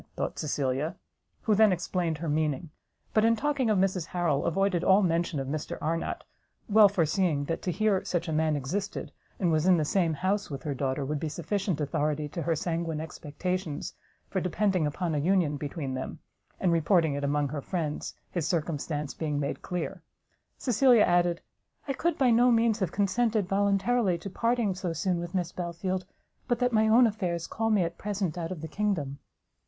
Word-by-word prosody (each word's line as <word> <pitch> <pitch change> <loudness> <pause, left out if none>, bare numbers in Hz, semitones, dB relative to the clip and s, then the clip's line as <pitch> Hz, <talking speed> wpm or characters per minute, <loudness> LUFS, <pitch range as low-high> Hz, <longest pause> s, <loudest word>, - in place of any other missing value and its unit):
thought - - -3
Cecilia; 140 0 -1 0.5
who 220 - +3
then 215 0 +6
explained 175 -2 -1
her 165 +2 -5
meaning; 155 +1 -1 0.4
but 215 - +4
in 230 +1 +4
talking 270 0 0
of 215 - +3
Mrs 185 -3 +1
Harrel, 170 -6 0
avoided 185 0 +1
all 195 +2 +5
mention 170 -3 0
of 135 - -3
Mr 150 +2 -4
Arnott, 165 +2 -2 0.4
well 210 -1 +7
foreseeing 165 -4 +1
that 165 +2 -3
to 180 - -1
hear 210 0 +1
such 175 0 -2
a 160 - -2
man 155 0 +2
existed, 185 +9 -3 0.3
and 175 -4 +2
was 155 +2 +2
in 185 -2 +6
the 155 - +1
same 165 -1 +1
house 195 +5 -1
with 140 0 -6
her 150 -3 -2
daughter, 135 +1 -1
would 150 +2 -2
be 160 0 -2
sufficient 180 +2 -2
authority 150 0 -1
to 170 - -4
her 165 0 +1
sanguine 165 0 -2
expectations, 160 +1 -4 0.3
for 190 - -2
depending 180 -2 +1
upon 165 +3 -2
a 150 - +1
union 170 -2 +2
between 145 -1 -4
them, 130 0 -4 0.4
and 180 - +2
reporting 165 -1 +3
it 145 0 -3
among 145 0 +1
her 145 0 -4
friends, 155 -2 -3 0.2
his 170 -3 -1
circumstance 150 -3 -2
being 150 -3 -2
made 140 - -3
clear, 180 +1 -4 0.6
Cecilia 245 -2 +4
added, 175 -1 +2 0.5
"I 275 - 0
could 335 +4 0
by 255 -3 +4
no 240 +2 +5
means 230 -1 +3
have 185 -5 -1
consented 210 +1 +1
voluntarily 200 +1 +2
to 195 +3 -8
parting 230 -1 +1
so 180 -2 -3
soon 175 +2 0
with 175 +2 -5
Miss 175 -2 -1
Belfield, 180 +1 -3 0.4
but 240 -2 +1
that 250 0 +1
my 220 0 +4
own 235 +3 +6
affairs 180 -6 -1
call 225 0 -2
me 210 -4 +3
at 170 0 -4
present 200 -5 -2
out 170 0 -4
of 175 -5 -5
the 160 - -5
kingdom." 160 -7 -2
175 Hz, 190 wpm, -28 LUFS, 155-200 Hz, 0.6 s, well